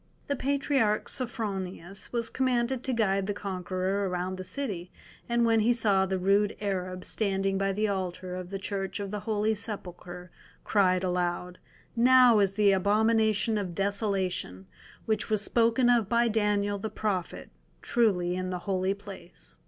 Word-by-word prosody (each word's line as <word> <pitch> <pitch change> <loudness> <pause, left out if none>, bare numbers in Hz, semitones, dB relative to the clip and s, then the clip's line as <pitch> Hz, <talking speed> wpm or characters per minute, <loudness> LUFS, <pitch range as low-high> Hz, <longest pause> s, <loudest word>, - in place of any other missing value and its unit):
The 285 - -1
Patriarch 270 -5 +1
Sophronius 195 -6 -4
was 235 -1 -2
commanded 250 -1 0
to 265 - 0
guide 195 -5 +1
the 205 - -2
conqueror 190 0 -2
around 180 +1 -2
the - - -4
city, 185 -3 -4 0.4
and 235 0 +2
when 225 -1 +3
he 230 +3 +3
saw 200 -5 +2
the 190 0 -1
rude 200 +3 +2
Arab 185 -3 -3
standing 195 -2 -1
by 195 0 +1
the 210 +2 0
altar 185 -2 -3
of 180 -1 -6
the 195 - -4
Church 195 0 -4
of 200 -1 -4
the 210 - -3
Holy 215 0 +1
Sepulchre, 180 -4 -6 0.3
cried 185 -3 +2
aloud, 180 0 -2 0.4
"Now 245 -1 +6
is 195 -1 +2
the 205 0 +4
Abomination 215 +2 +2
of 180 -4 -5
Desolation, 195 - -2 0.4
which 220 -2 -1
was 215 -1 +1
spoken 235 +2 +2
of 235 -4 +3
by 235 +1 +3
Daniel 205 -2 +1
the 220 - -4
prophet, 200 -4 -3 0.3
truly 180 -7 +1
in 185 0 -3
the 180 - -2
Holy 190 0 0
Place." 190 - -11
200 Hz, 155 wpm, -28 LUFS, 185-220 Hz, 0.4 s, Now